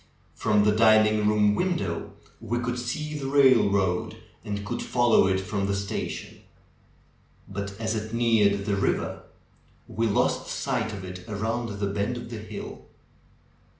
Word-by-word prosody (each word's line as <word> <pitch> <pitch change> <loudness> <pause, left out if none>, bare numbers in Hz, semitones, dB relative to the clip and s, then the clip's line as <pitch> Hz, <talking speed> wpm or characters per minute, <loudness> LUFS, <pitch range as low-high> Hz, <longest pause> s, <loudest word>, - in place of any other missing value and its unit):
From 105 -1 +2
the 105 - +4
dining 110 -1 +5
room 105 -1 +3
window 165 - -2 0.3
we 115 +1 -2
could 125 0 -2
see 150 +5 -4
the 140 -2 -4
railroad 105 -10 +3 0.3
and 100 0 -4
could 120 +2 -3
fol 120 -1 +1
low 95 - +6
it 95 0 +1
from 100 +1 -2
the 100 - 0
station. 100 -1 -5 1.1
But 100 +1 -6
as 110 0 -1
it 110 0 -4
neared 110 -4 +2
the 100 -1 0
river 95 - -1 0.7
we 115 +1 -1
lost 105 - +1
sight 125 -5 -2
of 100 -3 -7
it 90 +1 -9
around 110 +1 -2
the 100 - -1
bend 100 +4 -2
of 120 -1 -8
the 115 - -5
hill. 105 - -8
105 Hz, 150 wpm, -26 LUFS, 100-120 Hz, 1.1 s, low